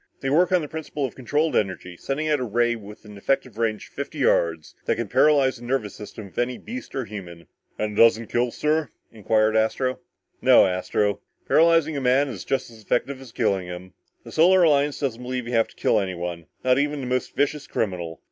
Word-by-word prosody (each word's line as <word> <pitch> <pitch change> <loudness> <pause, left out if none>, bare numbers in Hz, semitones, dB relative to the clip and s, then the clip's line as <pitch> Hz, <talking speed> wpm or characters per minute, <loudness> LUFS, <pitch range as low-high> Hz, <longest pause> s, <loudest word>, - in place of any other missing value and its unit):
They 135 - -1
work 175 +5 +4
on 180 -3 +3
a - - -5
principle 150 -2 -4
of 130 - -5
controlled 145 +5 0
energy, 95 -3 -1
sending 140 - -3
out 150 -2 +2
a - - -2
ray 120 +1 +1
with 105 -1 -12
an 105 -1 -11
effective 125 0 -1
range 110 -2 -1
of - - -32
fifty - - -6
yards 80 -2 +1
that - - +1
can 115 -2 -3
paralyze 140 +2 +3
the 120 - -13
nervous 120 -4 -2
system 105 0 -9
of - - -7
any 120 0 0
beast 255 +3 -8
or 130 -3 -2
human." 90 -5 -9 0.3
"And 105 0 -2
it - - +3
doesn't 115 0 +5
kill, 120 +1 +1
sir?" 150 +2 0 0.2
inquired 110 0 +1
Astro. 120 +4 +1 0.4
"No, - - +7
Astro," 90 +2 0
replied 100 0 -1
Strong. - - -45
"Paralyzing 165 -2 +4
a - - -2
man 130 +3 +3
is 105 -8 -6
just 135 -3 -2
as 110 -1 -14
effective 130 +5 -1
as 130 -3 -12
killing 100 -6 0
him. 90 +1 -8 0.3
The - - -11
Solar 180 +3 +5
Alliance 145 -2 +3
doesn't 125 -5 -2
believe 125 0 -4
you 120 - -4
have 115 -1 +3
to - - -20
kill 110 - +2
anyone, 85 -4 -4 0.2
not 130 +1 +3
even 145 0 -1
the - - -4
most 125 0 -2
vicious 145 +1 0
criminal. 85 -6 -3
120 Hz, 220 wpm, -24 LUFS, 105-140 Hz, 0.4 s, No